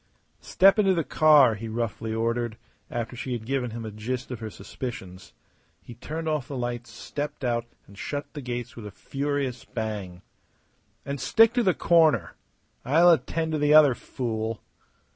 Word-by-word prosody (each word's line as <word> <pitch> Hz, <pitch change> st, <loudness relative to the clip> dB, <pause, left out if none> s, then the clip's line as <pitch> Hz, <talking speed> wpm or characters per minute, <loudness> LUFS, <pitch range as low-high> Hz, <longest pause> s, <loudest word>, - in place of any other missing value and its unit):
"Step 195 Hz, +3 st, +4 dB
into 195 Hz, -3 st, +4 dB
the 165 Hz, -, 0 dB
car!" 150 Hz, -6 st, +5 dB
he 110 Hz, +2 st, -6 dB
roughly 110 Hz, 0 st, -3 dB
ordered, 115 Hz, 0 st, -1 dB, 0.3 s
after 120 Hz, +1 st, -4 dB
she 125 Hz, +1 st, -4 dB
had 115 Hz, -2 st, -5 dB
given 130 Hz, -1 st, -1 dB
him 115 Hz, 0 st, -6 dB
a 110 Hz, -, -5 dB
gist 120 Hz, +5 st, -5 dB
of 120 Hz, -, -5 dB
her 110 Hz, -, -5 dB
suspicions. 95 Hz, -3 st, -8 dB, 0.5 s
He 100 Hz, +7 st, -12 dB
turned 155 Hz, +7 st, -6 dB
off 150 Hz, -5 st, -1 dB
the 140 Hz, -, -5 dB
lights, 120 Hz, -1 st, -4 dB
stepped 145 Hz, +6 st, -6 dB
out, 120 Hz, -1 st, -1 dB, 0.2 s
and 100 Hz, -, -16 dB
shut 145 Hz, +8 st, -4 dB
the 145 Hz, -, -6 dB
gates 120 Hz, -1 st, -5 dB
with 110 Hz, -3 st, -8 dB
a -, -, -9 dB
furious 140 Hz, +1 st, -3 dB
bang. 105 Hz, -6 st, -5 dB, 0.8 s
"And 140 Hz, -1 st, -4 dB
stick 225 Hz, -, +5 dB
to 245 Hz, -, +2 dB
the 190 Hz, -5 st, +2 dB
corner! 155 Hz, -, +3 dB, 0.5 s
I'll 165 Hz, +6 st, +5 dB
attend 160 Hz, 0 st, 0 dB
to 155 Hz, -, -1 dB
the 150 Hz, +1 st, +4 dB
other 150 Hz, -4 st, +8 dB
fool." 115 Hz, -3 st, -4 dB
125 Hz, 170 wpm, -26 LUFS, 115-150 Hz, 0.8 s, other